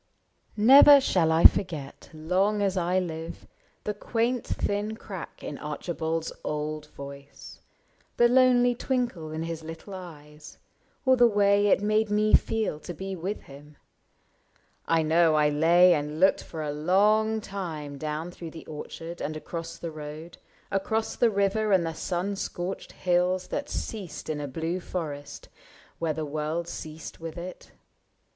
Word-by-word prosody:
Never 275 +6 +9
shall 180 -11 +2
I 160 +1 +3
forget, 155 -8 +3
long 185 +7 0
as 195 -1 +1
I 180 0 +1
live. 165 -2 -4 0.4
The 210 - -2
quaint 230 +4 -1
thin 205 +2 -2
crack 190 -6 -9
in 145 - -6
Archibald's 160 +2 -3
old 150 0 -3
voice. 140 -1 -11 0.6
The 240 - +6
lonely 245 -1 +5
twinkle 240 - -2
in 160 +1 -3
his 165 -1 -5
little 165 +5 -9
eyes. 150 -5 -11 0.5
Or 260 0 +6
the 240 -1 +6
way 205 -1 +3
it 200 - +3
made 215 +1 +2
me 210 +1 +2
feel 220 -9 +2
to 175 +2 -8
be 190 +3 -5
with 185 +4 -4
him. 145 +2 -14 1.1
I 165 -1 +3
know 160 0 +4
I 150 -1 +4
lay 170 +4 +5
and 150 0 -2
looked 190 +2 +4
for 160 -2 -6
a 150 - -2
long 210 +8 +3
time 160 -9 -6
Down 155 +3 -4
through 170 -2 -8
the 160 0 -11
orchard 165 +2 -8
and 155 +1 -3
across 165 +1 -6
the 170 -1 -6
road. 155 +2 -9 0.3
Across 220 +3 -1
the 240 - +4
river 205 +1 +1
and 185 -3 +4
the 165 - -3
sun 180 +4 -2
scorched 185 -1 -5
hills 180 +1 +1
That 290 0 -3
ceased 185 -7 -5
in 150 -1 -3
a 145 - -4
blue 165 +6 -3
forest, 150 -6 -6 0.5
where 165 -1 0
the 155 +1 -3
world 155 +3 -3
Ceased 160 -1 -8
with 165 0 -7
it. 180 +1 -9
170 Hz, 150 wpm, -27 LUFS, 155-205 Hz, 1.1 s, Never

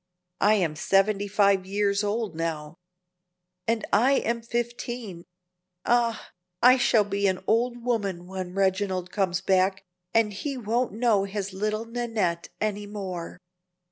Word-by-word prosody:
I 210 +2 +5
am 170 -7 0
seventy 195 +4 +2
five 200 -1 +3
years 200 +1 +1
old 210 -2 -1
now." 160 -2 -3 0.9
"And 225 -1 0
I 245 +7 +5
am 235 -3 0
fifteen. 235 -5 -4 0.6
Ah! 235 -2 +1 0.3
I 255 +1 +7
shall 230 -3 +4
be 200 0 0
an 185 -1 -1
old 240 +1 +1
woman 200 -8 -1
when 185 -1 -6
Reginald 190 -2 0
comes 185 -3 0
back, 190 0 +2 0.3
and 225 -2 +2
he 270 +7 -4
won't 235 +1 0
know 220 -3 +2
his 200 -1 -4
little 215 +3 -2
Nannette 225 -8 -2
any 210 -1 -2
more!" 190 -5 -6
205 Hz, 135 wpm, -26 LUFS, 190-230 Hz, 0.9 s, I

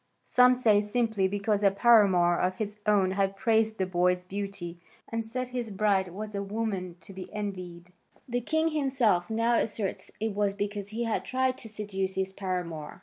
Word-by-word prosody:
Some 250 0 +5
say 220 -5 +4
simply 210 -2 +1
because 205 +1 0
a 200 - +6
paramour 195 -4 +5
of 185 +1 0
his 210 -1 -4
own 200 -3 +3
had 195 0 0
praised 220 +1 +2
the 190 - 0
boy's 180 0 +1
beauty 190 -2 -5 0.3
and 230 0 -2
said 250 +3 -4
his 245 -2 -3
bride 195 -2 +1
was 210 +4 -7
a 200 - -2
woman 200 -4 -3
to 195 - -11
be 185 -1 -8
envied. 180 -4 -6 0.3
The 245 0 -1
king 315 +6 +1
himself 260 - +1
now 230 +1 +2
asserts 210 -2 -2
it 220 0 -1
was 200 -1 0
because 205 -1 -3
he 225 +3 -3
had 230 -1 -1
tried 260 0 0
to 225 - -9
seduce 195 -3 -3
his 190 0 -2
paramour. 180 -5 -4
205 Hz, 180 wpm, -28 LUFS, 190-225 Hz, 0.3 s, a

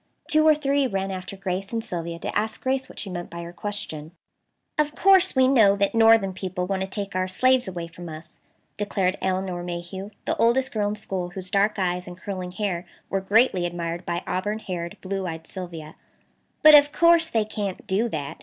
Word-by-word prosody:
Two 310 0 +4
or 310 - +7
three 280 -2 +1
ran 195 -3 -2
after 185 +1 -6
Grace 190 0 -3
and 230 -1 -2
Sylvia 170 -3 -5
to - - -5
ask 215 +1 -1
Grace 260 0 -1
what - - -14
she - - -4
meant 175 -2 -5
by 170 0 -7
her 170 +1 -9
question. 170 -5 -5 0.7
"Of 300 0 +1
course 385 -4 +5
we 260 0 +5
know 220 -7 +5
that 200 +2 +1
northern 225 -4 +5
people 185 -1 -3
want 190 0 -2
to 190 - -1
take 200 0 -5
our 185 0 0
slaves 255 +5 +2
away 175 -2 -4
from 170 +1 -10
us," 155 +1 -11 0.4
declared 195 -2 0
Elinor 185 -1 -1
Mayhew, 175 +3 -6 0.2
the - - 0
oldest 255 +3 +3
girl 210 -2 0
in 210 - -3
school, 190 -4 -4
whose 185 +1 -6
dark 205 +2 +2
eyes 180 -1 -1
and 175 0 -9
curling 185 -2 -5
hair 185 -3 -3 0.2
were 195 - 0
greatly 205 -1 +3
admired 170 0 -4
by 170 0 -3
auburn 205 +4 -2
haired, 175 -5 -5
blue 195 0 -3
eyed 160 -1 -6
Sylvia, 170 -5 -8 0.7
"but 310 0 +10
of 290 0 +8
course 335 0 +4
they 225 -5 +1
can't 205 -2 -4
do 215 +4 +1
that. 145 -7 -5
195 Hz, 200 wpm, -24 LUFS, 180-220 Hz, 0.7 s, but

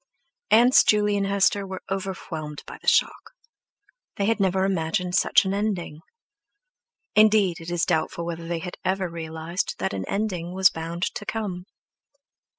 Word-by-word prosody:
Aunts 240 +4 +6
Juley 210 -1 +3
and 200 -1 0
Hester 200 0 +2
were 190 -1 -7
overwhelmed 175 -6 -5
by - - -10
the - - -16
shock. - - +2 0.8
They 200 - -1
had 225 +1 +1
never 190 -1 +2
imagined 180 0 -1
such - - +4
an 190 - -1
ending. 200 -7 -2 1.2
Indeed, 210 -4 +4
it 165 - -7
is 175 -1 0
doubtful 170 0 -1
whether 170 -1 -5
they 170 0 -2
had 180 +2 -7
ever 190 0 0
realized 165 +1 -4
that 95 0 -2
an 95 -1 -3
ending 185 -4 -2
was 190 0 +5
bound 165 +2 -5
to - - -6
come. 200 -5 -4
185 Hz, 155 wpm, -24 LUFS, 165-200 Hz, 1.2 s, Aunts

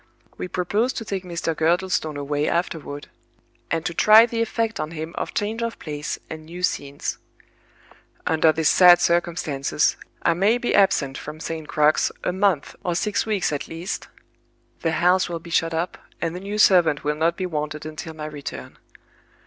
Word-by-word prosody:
We - - -5
propose 205 +8 0
to 225 - -5
take 195 -2 -3
Mr. 170 -2 -3
Girdlestone 165 -2 0
away 145 +1 -1
afterward, 155 -4 -3 0.6
and 165 0 -1
to 175 - -1
try 215 +6 +7
the 230 -1 -2
effect 225 0 -1
on 155 - -2
him 160 +1 -6
of - - -4
change 220 +3 -1
of 230 0 -3
place 150 -1 -5
and 160 -1 -8
new 175 +3 -9
scenes. 140 -5 -2 1.1
Under 160 0 +4
these 160 0 0
sad 175 -1 +7
circumstances, 170 -5 +1 0.3
I 170 - +4
may 200 +7 +3
be 245 - -1
absent 155 -9 +3
from 150 +1 -8
St. 160 -1 -5
Crux 150 +1 +3
a - - 0
month 190 -6 +1
or 175 -1 -1
six 210 +4 0
weeks 205 -6 0
at 145 - -3
least; 165 +4 -5 0.7
the 165 -1 0
house 180 +3 +3
will 170 - -3
be 170 +1 -12
shut 165 0 +2
up, 165 +2 -3 0.2
and 165 0 -2
the - - -4
new 200 +2 -5
servant 175 -8 +5
will 150 - +1
not 165 +2 +1
be 185 - -2
wanted 150 -3 -4
until 155 +1 -7
my 155 -1 -6
return. 150 -2 -8
170 Hz, 175 wpm, -23 LUFS, 155-185 Hz, 1.1 s, try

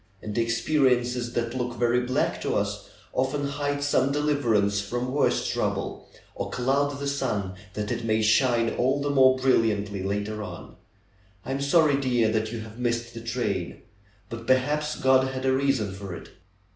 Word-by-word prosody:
And 105 -1 -5
experiences 120 0 +1
that 115 -1 -1
look 125 -1 -3
very 120 0 +2
black 125 +1 -1
to - - -1
us - - -2 0.2
often 135 +2 0
hide 145 0 -2
some 140 -1 +2
deliverance 120 -9 +1
from 120 +5 -3
worse 145 +2 +1
trouble, - - -2 0.2
or - - -4
cloud 140 +3 0
the 140 0 -4
sun, 105 -9 -1 0.2
that 105 0 -3
it 120 0 -2
may 110 -1 +1
shine 115 +1 +3
all 130 +3 +2
the 145 0 -1
more 130 -2 +5
brilliantly 105 -6 +1
later 105 +2 -2
on. 105 - -8 0.7
I - - -4
am 135 +1 -2
sorry, 145 0 +4
dear, 125 -5 +2
that 110 0 -1
you 115 -1 -5
have 110 +2 -11
missed 120 -1 -1
the 115 - -7
train. 115 -7 -3 0.4
But 115 0 -8
perhaps 150 +4 +1
God 130 0 +3
had 130 0 -4
a 130 - +3
reason 130 -7 +1
for 95 -2 -7
it." - - -11
125 Hz, 170 wpm, -26 LUFS, 110-135 Hz, 0.7 s, more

